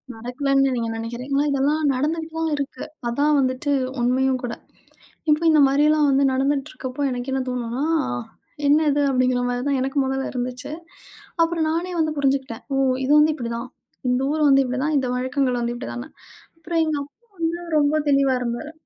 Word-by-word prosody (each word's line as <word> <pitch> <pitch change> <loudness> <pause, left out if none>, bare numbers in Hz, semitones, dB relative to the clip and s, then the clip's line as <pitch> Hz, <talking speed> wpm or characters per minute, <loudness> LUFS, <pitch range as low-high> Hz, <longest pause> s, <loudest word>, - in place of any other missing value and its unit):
நடக்கலன்னு 270 +4 +1
நீங்க 230 -1 -2
நினைக்கிறீங்களா? 250 +5 -2
இதெல்லாம் 285 +3 +1
நடந்துட்டு 315 +5 -1
தான் 325 -1 0
இருக்கு. 280 -1 -5 0.2
அதான் 285 +5 +2
வந்துட்டு 255 +2 0 0.3
உண்மயும் 255 +1 +2
கூட. 240 - -3 0.8
இப்ப 300 +1 +3
இந்த 310 -1 +5
மாரி 275 +2 +2
எல்லாம் 305 -1 +3
வந்து 275 0 +3
நடந்துட்டுருக்கப்போ, 270 -1 -2
எனக்கு 250 +1 -4
என்ன 265 0 0
தோணும்னா, 245 +1 -3 0.8
என்ன 290 +2 +5
இது 290 +1 +1
அப்படிங்கிற 255 -1 +2
மாரி 245 0 -1
தான் 280 -2 +1
எனக்கு 270 +2 -2
முதல்ல 270 0 -2
இருந்துச்சு. 250 +2 -4 0.7
அப்புறம் 330 -1 +1
நானே 340 +3 -1
வந்து 315 -1 +1
புரிஞ்சுக்கிட்டேன். 270 -4 -1
"ஓ! - - +1 0.3
இது 270 - 0
வந்து 305 +1 +4
இப்படி 235 -5 -5
தான். 240 +2 -6 0.4
இந்த 250 +1 +1
ஊர் 310 0 0
வந்து 275 0 +6
இப்படி 255 +1 -2
தான். 305 0 0
இந்த 265 -2 0
வழக்கங்கள் 255 0 0
வந்து 235 0 -1
இப்படி 250 +2 -6
தான்னு." 250 +5 -7 0.5
அப்புறம் 330 0 -1
எங்க 310 -2 -1
அப்பா 345 0 -5 0.2
ரொம்ப 290 +1 +2
தெளிவா 275 -1 +3
இருந்தாரு. 240 +5 -4
270 Hz, 170 wpm, -22 LUFS, 250-300 Hz, 0.8 s, வந்து